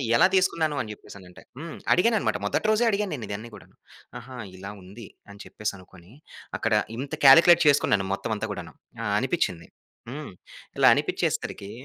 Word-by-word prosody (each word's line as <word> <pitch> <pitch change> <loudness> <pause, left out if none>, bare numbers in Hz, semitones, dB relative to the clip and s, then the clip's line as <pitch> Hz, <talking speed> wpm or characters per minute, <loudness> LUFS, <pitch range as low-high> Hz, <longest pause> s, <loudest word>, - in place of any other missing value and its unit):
ఎలా 180 +10 +6
తీసుకున్నాను 165 -5 +1
అని 110 -3 -6
చెప్పేసనంటే 95 -3 -14 0.2
హ్మ్. 165 0 -7 0.2
అడిగాననమాట. 215 - +2
మొదటి 215 - -1
రోజే 215 +2 +2
అడిగా 210 0 0
నేనిదన్ని 110 -2 -6
గూడాను. - - -17 0.4
ఆహా! 125 +1 -11 0.2
ఇలా 100 +2 -8
ఉంది 100 +4 -12 0.2
అని 100 0 -13
చెప్పేసనుకొని, 95 -2 -8 0.5
అక్కడ 115 - 0 0.2
ఇంత 140 +4 -6
కాలిక్యులేట్ 170 +5 +8
చేసుకున్నాను 110 -8 +3
మొత్తం 110 - -3
అంతా 110 - -4
గూడాను. 90 -3 -9 0.3
ఆ! - - -2
అనిపిచింది. 115 - -2 0.4
హ్మ్. 145 -4 -7 0.5
ఇలా - - +6
అనిపిచ్చేసరికి 100 0 -2
115 Hz, 140 wpm, -25 LUFS, 100-160 Hz, 0.5 s, కాలిక్యులేట్